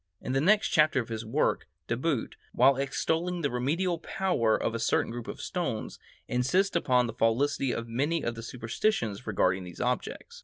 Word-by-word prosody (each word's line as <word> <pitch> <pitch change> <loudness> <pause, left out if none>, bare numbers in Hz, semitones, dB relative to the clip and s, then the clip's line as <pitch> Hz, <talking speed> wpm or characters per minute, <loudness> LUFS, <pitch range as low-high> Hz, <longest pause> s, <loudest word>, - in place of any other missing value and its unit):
In - - -5
the 135 +1 +2
next 210 +6 +4
chapter 155 -5 +4
of 120 - -4
his 110 -1 -4
work, 115 - 0 0.2
De 115 - -1
Boot, 135 -1 -1 0.2
while 135 +2 +5
extolling 165 +6 -1
the 140 - 0
remedial 165 +8 0
power 165 - +1
of 115 - -2
a 115 - -2
certain 115 - +1
group 120 -1 -6
of - - -6
stones, 170 - -3 0.3
insists 175 +12 +1
upon 125 -7 +3
the 115 - -4
falsity 130 +4 +1
of 115 0 -3
many 145 +8 0
of 120 - -1
the 115 - -8
superstitions 115 - -2
regarding 95 -3 +1
these 90 -1 -10
objects. - - -3
130 Hz, 185 wpm, -29 LUFS, 115-165 Hz, 0.3 s, while